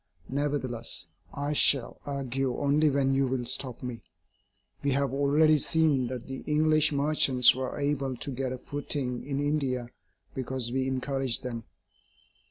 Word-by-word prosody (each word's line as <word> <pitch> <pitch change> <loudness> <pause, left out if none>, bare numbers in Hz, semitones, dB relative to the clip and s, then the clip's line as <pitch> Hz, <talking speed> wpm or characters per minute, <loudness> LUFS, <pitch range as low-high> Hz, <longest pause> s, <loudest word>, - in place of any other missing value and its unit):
Nevertheless, 135 -4 -2 0.3
I 145 +1 -2
shall 140 -3 +3
argue 135 -2 -2
only 145 +2 +3
when 135 -1 +1
you 135 0 +2
will 125 -1 -2
stop 125 0 -1
me. 125 -2 -5 0.8
We 140 -1 +1
have 140 -1 0
already 150 +2 +4
seen 150 -5 +2
that 125 -1 -6
the 135 0 -6
English 155 0 +3
merchants 140 -4 +4
were 130 0 -4
able 140 -3 -1
to 140 - -6
get 130 0 -3
a 130 - -4
footing 135 -2 -3
in 140 0 -3
India 135 -4 -1 0.4
because 130 -2 -3
we 130 +1 0
encouraged 130 -1 -2
them. 115 -3 -5
135 Hz, 145 wpm, -28 LUFS, 130-145 Hz, 0.8 s, already